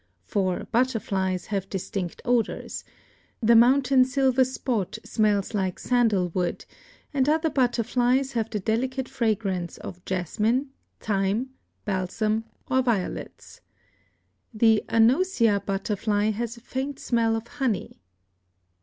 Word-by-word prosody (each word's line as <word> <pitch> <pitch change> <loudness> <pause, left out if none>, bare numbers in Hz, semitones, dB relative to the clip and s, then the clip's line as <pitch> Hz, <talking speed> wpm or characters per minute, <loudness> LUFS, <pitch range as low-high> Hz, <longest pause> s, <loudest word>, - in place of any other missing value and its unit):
For 185 - -1
butterflies 200 -7 0
have 195 -1 -2
distinct 190 -2 -4
odors; 240 -3 -1 0.6
the 235 0 +4
mountain 255 +2 +5
silver 265 0 +3
spot 250 -6 -2
smells 210 -1 +1
like 190 -3 -1
sandalwood, 190 -8 0 0.5
and 275 0 +2
other 315 +1 +2
butterflies 250 +1 +1
have 225 -3 -1
the 210 - -2
delicate 255 +6 -1
fragrance 210 -8 -1
of 180 0 -9
jasmine, 215 - 0 0.3
thyme, 210 +5 -1 0.3
balsam 215 +3 -1 0.2
or 260 0 +2
violets. 230 -7 -3 0.9
The 220 -1 +3
anosia 230 - +3
butterfly 205 +1 0
has 230 +2 -4
a - - -14
faint 265 +3 -4
smell 230 -3 +1
of 225 0 -4
honey. 240 - -3
225 Hz, 110 wpm, -25 LUFS, 200-255 Hz, 0.9 s, mountain